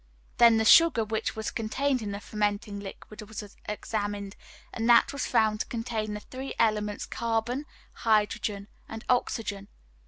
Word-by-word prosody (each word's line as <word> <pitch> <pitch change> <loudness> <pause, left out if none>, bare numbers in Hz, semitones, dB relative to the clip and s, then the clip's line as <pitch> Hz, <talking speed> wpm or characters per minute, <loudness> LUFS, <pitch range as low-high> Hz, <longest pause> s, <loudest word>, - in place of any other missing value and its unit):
Then 235 -1 +7
the 220 - +1
sugar 310 -5 +7
which 220 +1 -2
was 220 0 -3
contained 255 +4 -1
in 205 -2 -4
the 200 - -4
fermenting 205 0 -2
liquid 200 +2 -9
was 215 +1 -7 0.3
examined 205 -1 -3 0.4
and 230 0 -1
that 235 +3 +6
was 280 - -2
found 215 -1 +2
to - - -1
contain 225 -3 -3
the - - -4
three 260 +4 -7
elements 210 -2 +1
carbon, 235 +5 -2 0.3
hydrogen, 210 -2 0 0.2
and 225 0 -8
oxygen. 215 -5 0
220 Hz, 150 wpm, -28 LUFS, 210-235 Hz, 0.4 s, Then